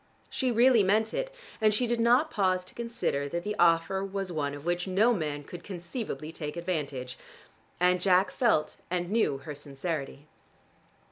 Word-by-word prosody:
She 255 -2 0
really 240 0 +5
meant 215 +3 +2
it, - - -2 0.3
and 215 -1 +4
she 245 - +2
did 240 0 0
not 245 +7 +4
pause 185 -3 +1
to - - -12
consider 230 -12 -2
that 170 +3 -3
the 210 +2 -2
offer 170 +3 +3
was 195 -1 -3
one 145 -3 -2
of 145 +1 -10
which 175 +1 -1
no 210 +6 +4
man 150 -7 -3
could 175 +4 -10
conceivably 175 - -5
take 150 -1 -6
advantage. 145 -8 -3 0.6
And 180 0 +3
Jack 185 0 +4
felt 225 -11 +1
and 175 +1 -2
knew 215 -11 +2
her 150 +2 -7
sincerity. 145 0 -5
180 Hz, 165 wpm, -29 LUFS, 155-215 Hz, 0.6 s, really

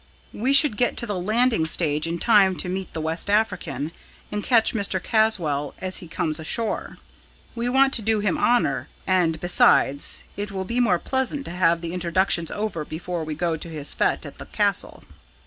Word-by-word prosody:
We 250 +6 -1
should 275 -5 +5
get 245 - 0
to - - 0
the 205 -5 -3
Landing 220 -2 +1
Stage 155 -2 +2
in 170 +1 -2
time 195 -2 +4
to 180 - -3
meet 185 0 -4
the 160 - -4
West 160 +5 -2
African, 165 - -1 0.4
and 210 0 -3
catch 230 -3 +3
Mr. 200 -4 0
Caswall 175 -10 0
as 185 0 -5
he 175 - -7
comes 160 -2 -2
ashore. 220 +8 -3 0.6
We 240 +1 -2
want 270 +2 +3
to 230 - +2
do 220 0 +1
him 205 -4 0
honour 245 0 +1 0.2
and, 175 -4 +1
besides, 145 -5 +3
it 205 0 -4
will 190 -1 -4
be 235 +5 -1
more 210 -8 +3
pleasant 265 - -2
to - - -6
have 170 -2 +2
the 170 0 -5
introductions 175 -1 0
over 205 -7 -3
before 170 +2 -5
we 155 -1 -5
go 170 +1 -1
to 170 - -7
his 150 -3 -3
fete - - 0
at - - -10
the - - -9
Castle." - - -1
185 Hz, 190 wpm, -23 LUFS, 165-220 Hz, 0.6 s, should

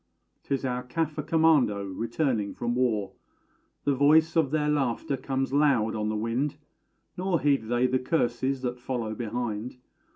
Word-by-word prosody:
'Tis 135 -1 -2
our 125 -1 -1
Caffer 150 +4 -2
Commando 155 -9 +3
returning 115 +3 -2
from 120 0 -2
war: 110 -6 0 0.7
The 145 - +2
voice 155 +4 +4
of 160 -4 +3
their 150 0 0
laughter 140 -2 0
comes 135 0 -2
loud 140 -7 +3
on 105 -1 -2
the 110 - -1
wind, 120 +7 -1 0.6
Nor 180 -2 0
heed 140 -6 +2
they 120 +2 +2
the 130 0 +2
curses 130 -1 0
that 125 0 -3
follow 120 -3 -3
behind. 120 +1 -4
130 Hz, 150 wpm, -27 LUFS, 115-145 Hz, 0.7 s, voice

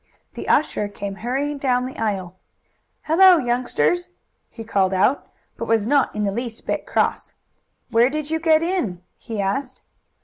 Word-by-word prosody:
The - - -7
usher 250 -8 +2
came 200 0 -6
hurrying 275 +5 -2
down 250 -2 +1
the 260 - -7
aisle. 195 -5 -2 0.7
"Hello, 360 +3 +6
youngsters!" 255 +7 0 0.4
he 225 - -9
called 195 -3 +1
out, 240 +9 +2 0.3
but - - -4
he - - -11
was 225 -2 +2
not 275 0 +2
in 210 - -1
the 200 - 0
least 235 +1 -5
bit - - -3
cross. - - -1 0.6
"Where 235 +2 +4
did 305 +1 -4
you 320 - 0
get 320 -1 +3
in?" 250 - -2
he 225 -2 -7
asked. 250 +7 -2
245 Hz, 165 wpm, -22 LUFS, 210-295 Hz, 0.7 s, Hello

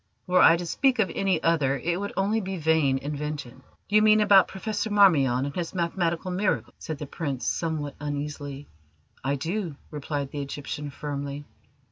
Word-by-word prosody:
Were 180 0 +4
I 165 - +7
to 175 - -5
speak 265 +9 +2
of 195 -6 +1
any 190 -4 0
other 145 -5 +2
it 175 +4 -1
would 200 0 -4
only 205 +3 +1
be 190 -1 -4
vain 160 -4 +2
invention." 145 -2 -5 0.3
"You 210 +1 +4
mean 215 0 +6
about 200 -2 +6
Professor 210 +2 -3
Marmion 145 -11 +4
and 140 - -5
his 175 0 -4
mathematical 170 0 -1
miracles?" 190 +2 -1
said 160 -3 -5
the 150 - -6
Prince 140 -3 -4
somewhat 155 -4 -2
uneasily. 145 -1 -5 0.6
"I 140 +2 0
do," 170 +3 -3 0.2
replied 145 -2 -4
the 145 - -4
Egyptian 145 +1 -5
firmly. 145 0 -5
160 Hz, 165 wpm, -26 LUFS, 145-190 Hz, 0.6 s, I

